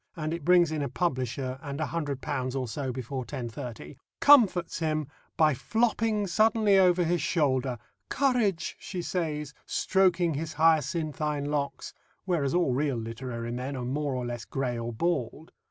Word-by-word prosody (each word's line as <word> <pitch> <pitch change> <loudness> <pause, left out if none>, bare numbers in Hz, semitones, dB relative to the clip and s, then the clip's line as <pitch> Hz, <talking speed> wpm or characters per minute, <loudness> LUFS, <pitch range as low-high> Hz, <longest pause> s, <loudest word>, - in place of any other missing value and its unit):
and 155 -1 -3
it 170 -2 -5
brings 175 -1 +5
in 155 -1 -2
a 140 - -2
publisher 130 -5 -2
and 140 -1 -6
£100 140 -4 -2
or 130 - -3
so 130 +3 -3
before 130 +1 -4
10.30 120 0 -7 0.2
comforts 215 -14 +5
him 155 -2 0 0.3
by 155 -2 +5
flopping 220 - 0
suddenly 215 +2 +3
over 180 -1 +4
his 175 +1 +1
shoulder. 135 -8 +1 0.3
"Courage," 235 - +1
she 180 -3 -5
says, 150 -5 -3
stroking 180 -3 +2
his 155 +2 -4
hyacinthine 155 -2 +1
locks 145 -1 -3 0.3
(whereas 165 -6 0
all 175 -8 +2
real 140 -1 0
literary 115 +1 -5
men 130 +3 -4
are 125 -2 -4
more 140 +1 -1
or 125 -1 -2
less 120 -2 -4
grey 130 -3 -2
or 115 0 -4
bald). 150 +2 -2
150 Hz, 150 wpm, -28 LUFS, 130-175 Hz, 0.3 s, brings